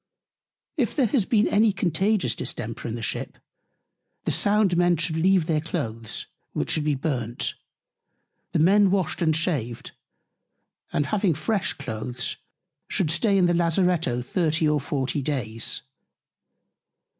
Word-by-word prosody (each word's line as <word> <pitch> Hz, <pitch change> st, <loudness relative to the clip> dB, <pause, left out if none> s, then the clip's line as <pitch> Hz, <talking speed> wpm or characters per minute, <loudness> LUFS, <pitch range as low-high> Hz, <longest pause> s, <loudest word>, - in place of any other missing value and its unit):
If 250 Hz, -6 st, 0 dB
there 275 Hz, -, +3 dB
has 225 Hz, -2 st, +1 dB
been 215 Hz, -1 st, +3 dB
any 215 Hz, +1 st, +4 dB
Contagious 195 Hz, +3 st, +1 dB
Distemper -, -, -4 dB
in -, -, -3 dB
the -, -, -6 dB
Ship; -, -, -3 dB, 0.9 s
The -, -, 0 dB
Sound 205 Hz, -3 st, +2 dB
Men 175 Hz, 0 st, +3 dB
should 160 Hz, 0 st, -1 dB
leave 180 Hz, +1 st, +3 dB
their 155 Hz, -2 st, +1 dB
Cloaths; 115 Hz, -, -4 dB, 0.3 s
which -, -, -1 dB
should 155 Hz, -3 st, 0 dB
be 150 Hz, -1 st, +2 dB
burnt; 125 Hz, -5 st, -2 dB, 1.0 s
the -, -, 0 dB
Men 195 Hz, +5 st, +5 dB
washed 185 Hz, -2 st, 0 dB
and 160 Hz, -2 st, +3 dB
shaved; 140 Hz, -, -2 dB, 1.0 s
and 145 Hz, -, +1 dB
having 190 Hz, +1 st, +1 dB
fresh 200 Hz, +4 st, 0 dB
Cloaths, 125 Hz, -1 st, -4 dB, 0.5 s
should 160 Hz, -5 st, 0 dB
stay 195 Hz, +4 st, +2 dB
in 185 Hz, -, +4 dB
the 175 Hz, -, +3 dB
Lazaretto 170 Hz, -7 st, +1 dB
30 160 Hz, +2 st, +1 dB
or 150 Hz, -1 st, +2 dB
40 140 Hz, +1 st, -1 dB
Days. 115 Hz, -6 st, -2 dB
165 Hz, 135 wpm, -25 LUFS, 140-190 Hz, 1.0 s, Men